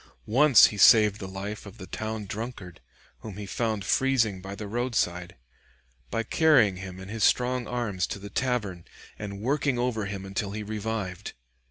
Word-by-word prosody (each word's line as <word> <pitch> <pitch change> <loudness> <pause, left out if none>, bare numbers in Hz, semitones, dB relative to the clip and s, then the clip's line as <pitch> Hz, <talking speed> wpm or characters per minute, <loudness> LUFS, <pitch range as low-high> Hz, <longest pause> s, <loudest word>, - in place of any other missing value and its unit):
Once 130 +2 +7
he - - -7
saved 105 0 +6
the 95 - -6
life 100 +3 -6
of 100 - -12
the 95 - -9
town 110 +1 -5
drunkard, 100 -5 -7 0.4
whom 105 -3 -9
he 105 - -6
found 110 0 -2
freezing 115 -7 +1
by 95 +1 -7
the 105 0 -7
roadside, 100 -7 -1 0.7
by 115 - -1
carrying 125 - +4
him 95 0 -8
in 95 - -9
his 110 +1 -3
strong 125 0 +2
arms 115 -7 -2
to - - -5
the 100 +1 -10
tavern, 105 -9 -2 0.4
and 100 -1 -6
working 135 +1 0
over 120 -4 -1
him 100 -1 -6
until 100 +1 -3
he 105 0 -4
revived. 105 -3 -4
105 Hz, 170 wpm, -27 LUFS, 95-120 Hz, 0.7 s, Once